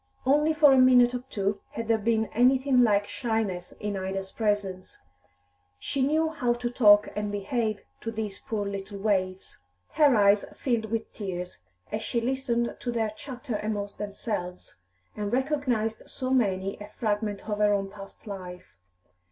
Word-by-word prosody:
Only 295 Hz, +4 st, +4 dB
for 295 Hz, -3 st, +7 dB
a 265 Hz, -, +5 dB
minute 250 Hz, -1 st, +6 dB
or 250 Hz, 0 st, -3 dB
two 200 Hz, -3 st, -1 dB
had 230 Hz, -1 st, -4 dB
there 225 Hz, -1 st, +3 dB
been 220 Hz, +1 st, +1 dB
anything 255 Hz, +2 st, +4 dB
like 205 Hz, -3 st, +3 dB
shyness 220 Hz, -7 st, -2 dB
in 205 Hz, -1 st, -4 dB
Ida's 190 Hz, 0 st, -4 dB
presence; 205 Hz, -4 st, -2 dB, 0.8 s
she 270 Hz, -, -3 dB
knew 310 Hz, +4 st, +2 dB
how 250 Hz, -6 st, 0 dB
to 240 Hz, 0 st, -3 dB
talk 210 Hz, -4 st, +6 dB
and 210 Hz, 0 st, -2 dB
behave 215 Hz, +1 st, -1 dB, 0.2 s
to 225 Hz, -, -5 dB
these 215 Hz, -3 st, -4 dB
poor 210 Hz, -2 st, -3 dB
little 200 Hz, 0 st, -5 dB
waifs. 190 Hz, -2 st, -1 dB, 0.3 s
Her 290 Hz, -5 st, +5 dB
eyes 200 Hz, -1 st, +5 dB
filled 235 Hz, -4 st, 0 dB
with 225 Hz, +1 st, -3 dB
tears 180 Hz, -, -5 dB, 0.3 s
as 215 Hz, -, -2 dB
she 235 Hz, +2 st, -1 dB
listened 240 Hz, -1 st, -1 dB
to 245 Hz, -, -3 dB
their 225 Hz, -2 st, 0 dB
chatter 250 Hz, -1 st, -6 dB
among 205 Hz, -1 st, -2 dB
themselves, 200 Hz, -, -5 dB, 0.4 s
and 205 Hz, -1 st, -3 dB
recognised 255 Hz, -5 st, -1 dB
so 255 Hz, 0 st, -4 dB
many 195 Hz, -6 st, +1 dB
a 205 Hz, -, -8 dB
fragment 210 Hz, -2 st, -2 dB
of 210 Hz, -1 st, -2 dB
her 210 Hz, 0 st, +4 dB
own 195 Hz, -1 st, 0 dB
past 195 Hz, -1 st, -12 dB
life. 185 Hz, -3 st, -8 dB
215 Hz, 160 wpm, -27 LUFS, 200-245 Hz, 0.8 s, for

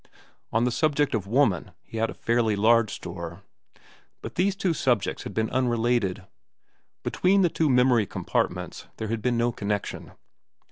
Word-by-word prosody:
On 115 Hz, +1 st, +2 dB
the 125 Hz, -, +1 dB
subject 145 Hz, +2 st, +1 dB
of 105 Hz, -4 st, -1 dB
woman 115 Hz, -6 st, +1 dB
he 115 Hz, -, -9 dB
had 115 Hz, 0 st, +1 dB
a -, -, -7 dB
fairly 115 Hz, -2 st, +1 dB
large 110 Hz, +1 st, +4 dB
store. 85 Hz, 0 st, -7 dB, 0.8 s
But -, -, -6 dB
these 190 Hz, +2 st, +1 dB
two 190 Hz, -3 st, 0 dB
subjects 125 Hz, -8 st, 0 dB
had -, -, -7 dB
been 110 Hz, 0 st, 0 dB
unrelated. 120 Hz, -6 st, 0 dB, 0.8 s
Between 195 Hz, +1 st, +2 dB
the 175 Hz, -, +4 dB
two 160 Hz, -1 st, +1 dB
memory 125 Hz, -4 st, +4 dB
compartments -, -, -2 dB
there 110 Hz, -, -4 dB
had 115 Hz, -1 st, -2 dB
been 120 Hz, +1 st, +1 dB
no 120 Hz, +1 st, +2 dB
connection. 100 Hz, -2 st, -4 dB
115 Hz, 155 wpm, -26 LUFS, 105-130 Hz, 0.8 s, large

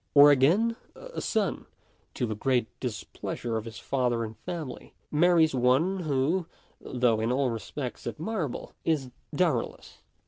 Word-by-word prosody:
Or 145 Hz, +1 st, +10 dB
again, 185 Hz, -, +4 dB, 0.2 s
a -, -, -7 dB
son, 210 Hz, -4 st, -1 dB, 0.5 s
to -, -, 0 dB
the 110 Hz, -, -2 dB
great 125 Hz, +2 st, +1 dB
displeasure 120 Hz, 0 st, -4 dB
of 110 Hz, 0 st, -2 dB
his 115 Hz, -1 st, -8 dB
father 125 Hz, -3 st, 0 dB
and 110 Hz, 0 st, -6 dB
family, 155 Hz, -, -7 dB, 0.2 s
marries 165 Hz, 0 st, +4 dB
one 130 Hz, +10 st, +3 dB
who, 155 Hz, +3 st, 0 dB, 0.3 s
though 120 Hz, -3 st, +1 dB
in 110 Hz, +2 st, 0 dB
all 130 Hz, -1 st, +2 dB
respects 120 Hz, +4 st, -5 dB
admirable, 160 Hz, -, -3 dB
is 140 Hz, -6 st, 0 dB, 0.2 s
dowerless. -, -, -1 dB
135 Hz, 135 wpm, -28 LUFS, 120-165 Hz, 0.5 s, Or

